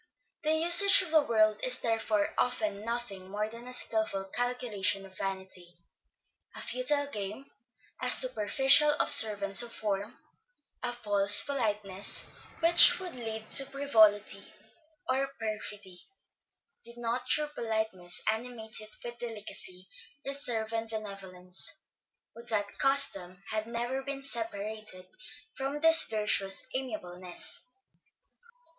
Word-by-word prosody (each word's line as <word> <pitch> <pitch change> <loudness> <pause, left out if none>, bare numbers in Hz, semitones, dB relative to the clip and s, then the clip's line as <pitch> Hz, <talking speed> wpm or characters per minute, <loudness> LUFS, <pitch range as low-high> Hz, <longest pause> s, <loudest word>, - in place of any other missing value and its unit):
The 310 -1 -1
usage 345 +5 +9
of 345 - -8
the 315 -1 +4
world 215 -5 0
is 255 0 +4
therefore 225 -2 -2
often 250 -4 -3
nothing 220 -5 -7
more 210 +2 -4
than 230 +2 -11
a 250 - -8
skilful 220 -5 -3
calculation 240 -6 -2
of 190 -1 -17
vanity, 190 -2 -6 0.8
a - - -8
futile 285 +3 +1
game, 210 +5 -8 0.5
a 250 - 0
superficial 265 +5 +4
observance 200 -2 +5
of 240 -1 -2
form, 205 +2 -5 0.6
a 245 - -4
false 205 -4 +5
politeness 210 -7 -2 0.4
which 340 +2 +8
would 365 -2 -7
lead 220 -2 -8
to 275 - +7
frivolity 220 -7 +1 0.6
or 265 +1 -1
perfidy, 210 -4 -8 0.8
did 235 +1 -13
not 240 +2 -5
true 300 +2 +1
politeness 220 -8 -4
animate 220 -1 -6
it 215 0 -9
with 240 0 -10
delicacy, 210 -5 -7 0.4
reserve 240 -5 -4
and 225 0 -4
benevolence. 195 - -4 0.5
Would 235 +1 -13
that 205 -3 -3
custom 195 -10 +2
had 215 0 -4
never 240 +3 -5
been 275 0 -8
separated 215 -5 -4 0.5
from 275 +2 -5
this 325 +1 +6
virtuous 210 -3 -1
amiableness! 185 -9 -6
225 Hz, 115 wpm, -28 LUFS, 200-255 Hz, 0.8 s, usage